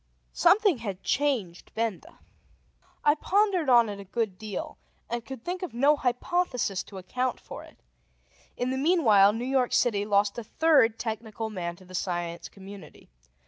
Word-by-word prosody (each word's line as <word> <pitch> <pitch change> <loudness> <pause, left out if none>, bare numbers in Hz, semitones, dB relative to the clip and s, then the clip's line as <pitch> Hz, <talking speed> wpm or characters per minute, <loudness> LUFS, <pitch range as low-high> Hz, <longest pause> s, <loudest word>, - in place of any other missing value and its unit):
Something 400 - +4
had 200 -5 -6
changed 245 -12 -1
Benda. 225 -4 -3 0.9
I 295 - +5
pondered 370 -1 +1
on 240 -2 +6
it 205 -1 -6
a - - -7
good 195 -1 -3
deal, 210 -3 -6 0.3
and 235 0 -3
could 255 0 -9
think 360 +1 -3
of 360 -10 -6
no 280 +5 +4
hypothesis 250 - -1
to 195 - -11
account 250 +7 -2
for - - -10
it. - - -17 0.8
In 250 +1 -1
the 265 - -2
meanwhile, 245 - +5
New 230 +3 -4
York 260 -1 +1
City 210 -5 +2
lost 205 +1 +1
a - - -6
third 260 -3 +3
technical 220 -1 -4
man 170 -4 -4
to 185 - -17
the 185 - -14
Science 175 -2 -3
Community. 195 -4 -13
230 Hz, 160 wpm, -27 LUFS, 200-270 Hz, 0.9 s, on